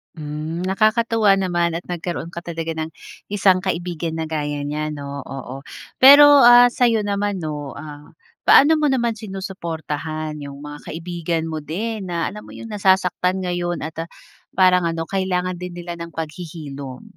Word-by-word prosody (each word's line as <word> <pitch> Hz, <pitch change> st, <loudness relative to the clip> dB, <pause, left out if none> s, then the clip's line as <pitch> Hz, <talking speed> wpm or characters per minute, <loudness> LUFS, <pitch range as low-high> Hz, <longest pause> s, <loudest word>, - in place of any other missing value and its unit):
Hmm, 155 Hz, +2 st, -5 dB
nakakatuwa 215 Hz, +1 st, +3 dB
naman 175 Hz, -2 st, +1 dB
at 175 Hz, -, -8 dB
nagkaroon 170 Hz, -1 st, -4 dB
ka -, -, -3 dB
talaga 165 Hz, -1 st, -3 dB
ng 160 Hz, 0 st, -3 dB, 0.5 s
isang 190 Hz, -2 st, +4 dB
kaibigan 170 Hz, -2 st, -3 dB
na 160 Hz, 0 st, -2 dB
gaya 145 Hz, -1 st, -2 dB
niya 150 Hz, +1 st, -3 dB
'no, 140 Hz, -1 st, -7 dB, 0.3 s
oo. 135 Hz, -1 st, -7 dB, 0.5 s
Pero, 285 Hz, +2 st, +11 dB, 0.3 s
ah, 245 Hz, 0 st, +8 dB
sayo 235 Hz, -3 st, +3 dB
naman 200 Hz, 0 st, -1 dB
'no, 155 Hz, -1 st, -3 dB, 0.3 s
ah, 150 Hz, 0 st, -10 dB, 0.4 s
paano 290 Hz, +3 st, +7 dB
mo 300 Hz, -, +2 dB
naman 235 Hz, -2 st, +1 dB
sinusuportahan 160 Hz, -6 st, -5 dB
yung 140 Hz, 0 st, -9 dB
mga 150 Hz, 0 st, -8 dB
kaibigan 170 Hz, 0 st, -3 dB
mo 155 Hz, -, -3 dB
din 220 Hz, +4 st, -3 dB
na 170 Hz, -, -2 dB
alam 210 Hz, +1 st, -9 dB
mo -, -, -13 dB
yung 225 Hz, -, -8 dB
nasasaktan 190 Hz, -2 st, +2 dB
ngayon 175 Hz, -1 st, -2 dB
at, 160 Hz, -, -12 dB
ah, -, -, -21 dB, 0.5 s
parang 180 Hz, -2 st, +5 dB
ano 165 Hz, 0 st, -3 dB
kailangan 185 Hz, -1 st, -1 dB
din 180 Hz, -1 st, -6 dB
nila 175 Hz, 0 st, -6 dB
ng 170 Hz, 0 st, -7 dB
paghihilom? 150 Hz, -5 st, -7 dB
175 Hz, 155 wpm, -21 LUFS, 155-190 Hz, 0.5 s, Pero